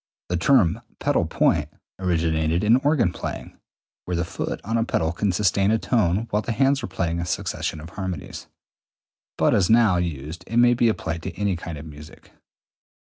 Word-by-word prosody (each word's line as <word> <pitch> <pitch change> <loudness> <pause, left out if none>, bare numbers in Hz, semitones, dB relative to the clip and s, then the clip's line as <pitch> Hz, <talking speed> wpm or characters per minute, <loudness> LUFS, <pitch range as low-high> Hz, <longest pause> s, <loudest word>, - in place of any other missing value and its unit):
The 90 - 0
term 95 -4 +3 0.2
pedal - - +1
point 75 -1 +1 0.3
originated 80 -2 0
in 110 +3 +5
organ 130 - +2
playing, - - -6 0.5
(where 90 - -2
the 85 - 0
foot - - -4
on 115 +4 -2
a 115 - +2
pedal 80 -8 0
can 95 +4 0
sustain 100 +1 +2
a 110 - +3
tone 110 -3 +1
while 105 - +1
the 115 - -3
hands 135 +3 +2
are - - -4
playing 85 -2 -2
a 85 - -2
succession 80 - -3
of 80 +2 -10
harmonies), 95 -6 -6 0.9
but - - +3
as 95 -3 +2
now 110 -5 +5
used 85 -1 -4
it 115 - -2
may 120 0 +6
be 120 -1 +3
applied 80 -6 -3
to - - -5
any 100 -2 0
kind 85 -1 -6
of 75 - -9
music. 75 0 -13
90 Hz, 185 wpm, -23 LUFS, 80-110 Hz, 0.9 s, may